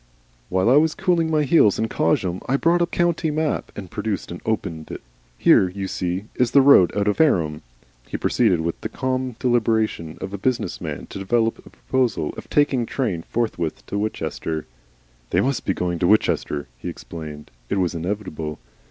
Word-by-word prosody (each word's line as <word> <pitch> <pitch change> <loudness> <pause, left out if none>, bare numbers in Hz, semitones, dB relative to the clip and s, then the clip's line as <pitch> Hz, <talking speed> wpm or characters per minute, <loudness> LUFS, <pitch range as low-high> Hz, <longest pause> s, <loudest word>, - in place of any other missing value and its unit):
"While 95 +3 +1
I 130 +4 +6
was 155 +1 +3
cooling 170 -3 +1
my 155 -1 +2
heels 130 - +4
in 110 - 0
Cosham 90 -1 0
I 135 - +3
bought 170 +4 +3
a 170 - +3
county 170 -2 0
map." 155 0 -1
He 100 - -5
produced 105 +1 -4
and 85 - -7
opened 90 -8 -2
it. - - -7 0.4
"Here, 90 - +5
you 95 +1 -4
see, 90 +1 -3
is 125 -1 +1
the 140 - +6
road 135 -11 +7
out 100 0 +1
of 105 - +1
Fareham." 80 - +2 0.5
He - - -4
proceeded 85 -3 +2
with 85 0 -3
the 110 - -3
calm 130 0 -2
deliberation 110 -9 0
of 95 +1 -6
a 100 - -4
business 125 +4 -1
man - - -5
to - - -6
develop 115 +4 +1
a - - -15
proposal 125 - -1
of - - -10
taking 135 -5 +2
train 110 -11 -1
forthwith 110 -9 -2
to 100 - -3
Winchester. 80 -6 -3 0.6
"They - - +2
MUST 135 +1 0
be 95 - +1
going 85 -1 -2
to 85 - +2
Winchester," 75 -8 +1
he - - -5
explained. 75 -2 -9 0.2
It - - 0
was 90 -2 +1
inevitable. 85 -4 -4
105 Hz, 185 wpm, -22 LUFS, 85-130 Hz, 0.6 s, road